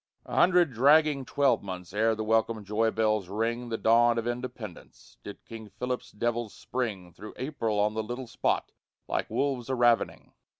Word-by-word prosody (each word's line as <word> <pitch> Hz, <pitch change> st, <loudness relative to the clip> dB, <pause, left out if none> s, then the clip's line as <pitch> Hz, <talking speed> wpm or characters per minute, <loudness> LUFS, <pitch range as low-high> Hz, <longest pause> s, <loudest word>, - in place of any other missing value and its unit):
A -, -, -6 dB
hundred 175 Hz, -5 st, +4 dB
dragging 145 Hz, +3 st, +4 dB
twelvemonths 100 Hz, -11 st, 0 dB
ere 110 Hz, +2 st, +2 dB
the 110 Hz, -, -3 dB
welcome 110 Hz, -1 st, +1 dB
joy 110 Hz, +3 st, +1 dB
bells 110 Hz, -4 st, 0 dB
ring 115 Hz, +4 st, -2 dB
The 115 Hz, -, -2 dB
dawn 115 Hz, +1 st, +4 dB
of 115 Hz, -, -1 dB
Independence 120 Hz, +1 st, -7 dB
did 100 Hz, -, -10 dB
King 110 Hz, -2 st, -9 dB
Philip's 125 Hz, +4 st, -4 dB
devils 120 Hz, 0 st, -2 dB
spring 100 Hz, -9 st, -4 dB
Through 105 Hz, -, -11 dB
April 120 Hz, -6 st, -2 dB
on 105 Hz, +1 st, +2 dB
the 110 Hz, -, -1 dB
little 120 Hz, +4 st, -5 dB
spot, 120 Hz, -, -1 dB, 0.4 s
like -, -, -2 dB
wolves 135 Hz, -3 st, -1 dB
a 130 Hz, -, 0 dB
ravening. 120 Hz, -2 st, +1 dB
115 Hz, 165 wpm, -28 LUFS, 110-125 Hz, 0.4 s, hundred